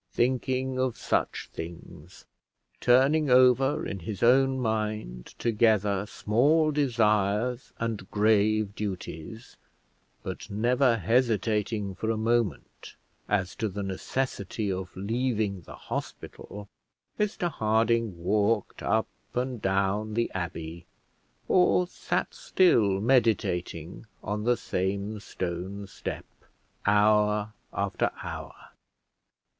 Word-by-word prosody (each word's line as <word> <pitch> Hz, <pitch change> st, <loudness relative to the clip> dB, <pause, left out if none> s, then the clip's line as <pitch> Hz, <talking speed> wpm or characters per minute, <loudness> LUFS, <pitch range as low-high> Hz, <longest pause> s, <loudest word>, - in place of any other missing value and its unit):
Thinking 130 Hz, +1 st, 0 dB
of 130 Hz, -3 st, 0 dB
such -, -, -1 dB
things, 85 Hz, 0 st, -9 dB, 0.5 s
turning 135 Hz, +5 st, +4 dB
over 130 Hz, +2 st, +4 dB
in 100 Hz, -, -4 dB
his 95 Hz, +4 st, -5 dB
own 130 Hz, +2 st, +4 dB
mind 110 Hz, -, -3 dB
together 105 Hz, -3 st, +2 dB
small 150 Hz, +12 st, +2 dB
desires 115 Hz, -3 st, +1 dB
and 115 Hz, -5 st, -3 dB
grave 105 Hz, 0 st, +2 dB
duties, 100 Hz, +1 st, -6 dB, 0.7 s
but -, -, -6 dB
never 120 Hz, +4 st, +2 dB
hesitating 110 Hz, -1 st, +1 dB
for 110 Hz, +4 st, -3 dB
a 115 Hz, -, +1 dB
moment 115 Hz, 0 st, -1 dB, 0.3 s
as 95 Hz, -3 st, 0 dB
to 110 Hz, -, -1 dB
the 100 Hz, +1 st, -4 dB
necessity 100 Hz, +1 st, -3 dB
of 95 Hz, 0 st, -4 dB
leaving 110 Hz, -2 st, -1 dB
the -, -, -11 dB
hospital, 100 Hz, 0 st, -7 dB, 0.5 s
Mr 200 Hz, -4 st, 0 dB
Harding 110 Hz, -, +1 dB
walked 105 Hz, +3 st, +1 dB
up -, -, +1 dB, 0.3 s
and 125 Hz, -2 st, -2 dB
down 100 Hz, +3 st, 0 dB
the 115 Hz, 0 st, 0 dB
abbey, 85 Hz, -2 st, -5 dB, 0.6 s
or 180 Hz, 0 st, +4 dB
sat 180 Hz, -, -3 dB
still 110 Hz, -, +3 dB
meditating 100 Hz, -, 0 dB, 0.2 s
on 105 Hz, +2 st, -3 dB
the 120 Hz, 0 st, +3 dB
same 100 Hz, +3 st, -2 dB
stone 95 Hz, +2 st, -5 dB
step, -, -, -6 dB, 0.6 s
hour 105 Hz, 0 st, +3 dB, 0.2 s
after -, -, 0 dB
hour. -, -, -6 dB
110 Hz, 100 wpm, -27 LUFS, 100-120 Hz, 0.7 s, turning